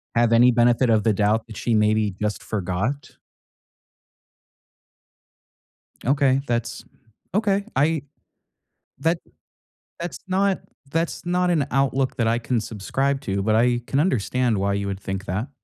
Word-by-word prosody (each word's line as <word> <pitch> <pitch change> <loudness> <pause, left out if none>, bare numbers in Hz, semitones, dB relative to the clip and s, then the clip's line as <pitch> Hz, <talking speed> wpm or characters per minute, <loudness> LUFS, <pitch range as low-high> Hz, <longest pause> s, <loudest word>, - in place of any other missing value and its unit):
have 115 0 +3
any 120 +2 +6
benefit 120 +1 +3
of 110 -2 +3
the 110 -2 +3
doubt 110 +2 +1
that 110 - -10
she 115 -2 0
maybe 105 -2 +2
just 105 0 -2
forgot? 105 +7 -3 2.9
Okay, 135 0 +3
that's 115 -1 -2 0.5
okay. 205 -1 +1
I 155 +2 +2 1.0
that 165 +3 +1 0.8
that's 170 -1 -5
not 190 +1 +1 0.3
that's 165 +2 -2
not 180 0 +1
an 145 -5 +1
outlook 135 -1 +1
that 115 -2 +1
I 115 +1 +2
can 115 0 -1
subscribe 135 +7 -2
to, 100 -5 -2
but 110 0 +2
I 120 +1 +3
can 140 - 0
understand 125 - +1
why 100 +1 0
you 100 0 -2
would 100 -1 -4
think 95 +1 -5
that. 105 +9 -3
120 Hz, 140 wpm, -23 LUFS, 105-140 Hz, 2.9 s, any